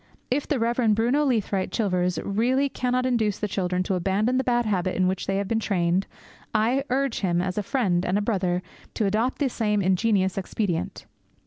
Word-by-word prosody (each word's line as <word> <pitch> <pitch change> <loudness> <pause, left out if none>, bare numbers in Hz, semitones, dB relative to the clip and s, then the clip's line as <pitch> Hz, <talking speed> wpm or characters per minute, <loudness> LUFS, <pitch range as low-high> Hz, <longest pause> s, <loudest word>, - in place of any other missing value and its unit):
If 280 +3 0
the 290 - 0
Rev. 230 -2 +2
Bruno 245 +7 +2
Leathwaite 215 -8 0
Chilvers 180 -5 0
really 250 +7 +1
cannot 255 -1 -1
induce 225 -5 +1
the 210 - -2
children 185 -2 -1
to 190 - -2
abandon 195 +7 +1
the 260 - +1
bad 240 -2 +1
habit 185 -3 0
in 185 0 +2
which 190 0 -2
they 195 - 0
have 200 0 -2
been 225 +2 0
trained, 185 -3 0 0.5
I 235 +5 +2
urge 270 -1 0
him, 175 -3 +1
as 185 +1 -2
a 210 - 0
friend 195 -6 0
and 190 +2 +1
a - - +1
brother, 185 -4 0 0.3
to 215 - 0
adopt 220 +6 0
the 285 - +1
same 215 -4 0
ingenious 190 0 +1
expedient. 185 -3 -3
210 Hz, 195 wpm, -25 LUFS, 185-240 Hz, 0.5 s, Rev